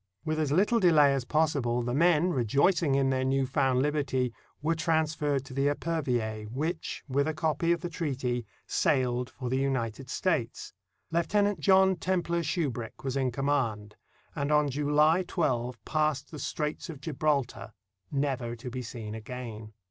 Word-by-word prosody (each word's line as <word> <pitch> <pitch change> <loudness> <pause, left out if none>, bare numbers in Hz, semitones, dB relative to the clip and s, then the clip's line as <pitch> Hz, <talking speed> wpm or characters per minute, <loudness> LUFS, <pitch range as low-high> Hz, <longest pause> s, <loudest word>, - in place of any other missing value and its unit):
With 155 0 -1
as 150 -3 0
little 210 +9 +3
delay 155 -7 +5
as 135 -3 -2
possible, 135 -5 +1
the 120 +1 -2
men, 170 +3 +3
rejoicing 140 - +2
in 135 -1 +2
their 130 0 0
new 135 0 +1
found 130 -1 +1
liberty, 135 -4 0 0.3
were 160 +3 +1
transferred 155 -4 0
to 130 - -10
the 140 +2 +1
Epervier, 125 -9 -1
which, 155 +9 -3
with 140 +2 +1
a 155 - -2
copy 160 +1 +1
of 170 - +1
30s - - -21
NORTHERN - - -1
AFRICA 170 - -12
the - - -8 0.4
treaty, - - -19 0.2
sailed 125 -1 +1
for 130 -2 -6
the 130 - +1
United 130 -2 -2
States. 145 -9 -1 0.4
Lieutenant 200 +3 +1
John 190 +3 +4
Templar 175 -2 0
Shubrick 140 -8 -3
was 135 -1 -2
in 130 -2 +1
command, 120 -6 -1 0.4
and 140 +1 -1
on 150 -1 +3
July 150 +4 +3
12 125 -9 -1
passed 155 -2 0
the 155 - -7
Straits 150 +5 -3
of 155 -4 -7
Gibraltar, 140 -6 -1 0.4
never 135 -4 -1
to 120 +1 -8
be 130 +1 -4
seen 110 -3 -7
again. 110 -1 -7
140 Hz, 165 wpm, -29 LUFS, 125-160 Hz, 0.4 s, delay